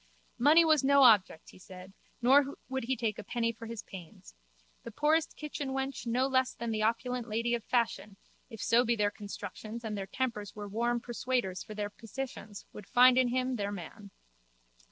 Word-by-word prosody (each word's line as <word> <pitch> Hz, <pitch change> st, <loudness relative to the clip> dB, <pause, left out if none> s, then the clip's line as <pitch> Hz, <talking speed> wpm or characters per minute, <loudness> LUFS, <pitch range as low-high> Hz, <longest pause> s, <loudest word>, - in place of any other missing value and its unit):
Money 310 Hz, +7 st, +6 dB
was 310 Hz, -3 st, +4 dB
no 280 Hz, 0 st, +5 dB
object, 205 Hz, -9 st, +4 dB
he -, -, -17 dB
said, 185 Hz, 0 st, -12 dB, 0.3 s
nor 275 Hz, +3 st, +4 dB
would 265 Hz, -2 st, -3 dB
he 260 Hz, +1 st, -1 dB
take 220 Hz, -3 st, -2 dB
a -, -, -6 dB
penny 230 Hz, +3 st, -1 dB
for 230 Hz, 0 st, -10 dB
his 230 Hz, -1 st, -6 dB
pains. 165 Hz, -, -12 dB, 0.5 s
The -, -, -8 dB
poorest 315 Hz, +2 st, +1 dB
kitchenwench 270 Hz, -4 st, -4 dB
no 250 Hz, +3 st, +1 dB
less 260 Hz, -1 st, +1 dB
than 235 Hz, 0 st, -4 dB
the 215 Hz, -1 st, -1 dB
opulent 235 Hz, +2 st, -1 dB
lady 230 Hz, +2 st, -1 dB
of 235 Hz, -2 st, -1 dB
fashion, 225 Hz, -4 st, -1 dB, 0.3 s
if 225 Hz, -3 st, -10 dB
so 235 Hz, +1 st, +4 dB
be 235 Hz, -1 st, +1 dB
their 205 Hz, -2 st, +1 dB
constructions 210 Hz, +2 st, -8 dB
and 215 Hz, -2 st, -4 dB
their 195 Hz, -1 st, -5 dB
tempers 215 Hz, -2 st, -3 dB
were 205 Hz, -1 st, -6 dB
warm 235 Hz, +3 st, -1 dB
persuaders 240 Hz, -6 st, -2 dB
for 215 Hz, -1 st, -9 dB
their 205 Hz, 0 st, -3 dB
petitions, 225 Hz, -2 st, -8 dB
would 210 Hz, -, -10 dB
find 250 Hz, +1 st, +6 dB
in 255 Hz, -1 st, +4 dB
him 255 Hz, +1 st, -1 dB
their 200 Hz, -1 st, -2 dB
man. 200 Hz, +2 st, -9 dB
235 Hz, 185 wpm, -31 LUFS, 210-260 Hz, 0.5 s, Money